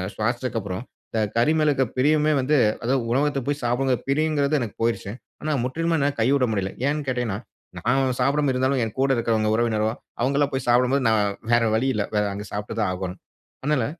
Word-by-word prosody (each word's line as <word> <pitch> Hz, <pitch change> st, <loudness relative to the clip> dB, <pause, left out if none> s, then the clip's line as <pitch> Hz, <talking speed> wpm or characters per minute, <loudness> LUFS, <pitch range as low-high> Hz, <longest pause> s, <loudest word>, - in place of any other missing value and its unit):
சுவாசிச்சதுக்கப்புறம், 110 Hz, -3 st, -2 dB, 0.3 s
இந்த 110 Hz, -, -1 dB, 0.2 s
கறி 120 Hz, +6 st, +4 dB
மேலருக்க 145 Hz, -3 st, +3 dB
பிரியமே 150 Hz, +3 st, +3 dB
வந்து, 140 Hz, +4 st, +2 dB, 0.3 s
அதாவது 130 Hz, +2 st, +1 dB
உணவகத்தில 140 Hz, +1 st, +1 dB
போய் 145 Hz, 0 st, -1 dB
சாப்பிடணுங்கிற 125 Hz, +1 st, +1 dB
பிரியங்கிறது 150 Hz, 0 st, +2 dB
எனக்கு 110 Hz, -4 st, -5 dB
போயிருச்சு. 115 Hz, -3 st, -1 dB, 0.3 s
ஆனா 155 Hz, -, -1 dB
முற்றிலுமே 165 Hz, +6 st, 0 dB
என்னால 140 Hz, 0 st, +1 dB
கைவிட 130 Hz, +2 st, +3 dB
முடியலை. 95 Hz, -2 st, -2 dB
ஏன்னு 150 Hz, 0 st, -1 dB
கேட்டீங்கன்னா, 120 Hz, -6 st, -1 dB, 0.4 s
நான் 130 Hz, 0 st, +1 dB
சாப்பிடாம 140 Hz, +1 st, +2 dB
இருந்தாலும் 130 Hz, +1 st, +1 dB
என் 110 Hz, -1 st, -4 dB
கூட 135 Hz, 0 st, +3 dB
இருக்கிறவங்க, 110 Hz, -2 st, +1 dB
உறவினரோ 110 Hz, -2 st, +1 dB, 0.3 s
அவங்கல்லாம் 140 Hz, +2 st, +1 dB
போய் 130 Hz, -1 st, -2 dB
சாப்பிடும்போது, 125 Hz, +3 st, +3 dB
நான் 110 Hz, -2 st, +3 dB, 0.3 s
வேற 120 Hz, 0 st, +4 dB
வழி 125 Hz, +4 st, +1 dB
இல்லை. 100 Hz, -, 0 dB
வேற 105 Hz, -, +3 dB
அங்க 105 Hz, +1 st, -6 dB
சாப்பிட்டு 105 Hz, +2 st, -4 dB
தான் 105 Hz, -, +1 dB
ஆகோணும். 90 Hz, -1 st, -5 dB, 0.4 s
அதனால 140 Hz, -5 st, +1 dB
125 Hz, 170 wpm, -24 LUFS, 110-140 Hz, 0.4 s, கறி